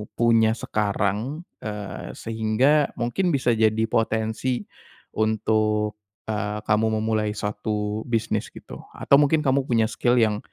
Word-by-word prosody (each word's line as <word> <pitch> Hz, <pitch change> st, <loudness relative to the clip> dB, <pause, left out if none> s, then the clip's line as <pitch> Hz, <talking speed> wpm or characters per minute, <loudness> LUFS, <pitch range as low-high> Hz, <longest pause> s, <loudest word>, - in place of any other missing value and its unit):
punya 115 Hz, -1 st, +4 dB
sekarang, 105 Hz, -, -2 dB, 0.2 s
eee, 105 Hz, -, -6 dB
sehingga 115 Hz, +7 st, +2 dB
mungkin 120 Hz, +11 st, -1 dB
bisa 130 Hz, -3 st, +2 dB
jadi 110 Hz, -1 st, +2 dB
potensi 110 Hz, +2 st, 0 dB, 0.5 s
untuk, 110 Hz, -1 st, 0 dB, 0.3 s
eee, 105 Hz, 0 st, -2 dB
kamu 110 Hz, +1 st, +1 dB
memulai 110 Hz, -1 st, 0 dB
suatu 105 Hz, 0 st, -3 dB
bisnis 115 Hz, -1 st, -1 dB
gitu? -, -, -11 dB, 0.2 s
Atau 140 Hz, -, +4 dB
mungkin 150 Hz, +1 st, +3 dB
kamu 135 Hz, -1 st, +2 dB
punya 115 Hz, -2 st, +2 dB
skill 120 Hz, +1 st, +1 dB
yang 105 Hz, -2 st, +2 dB
110 Hz, 120 wpm, -24 LUFS, 105-120 Hz, 0.5 s, punya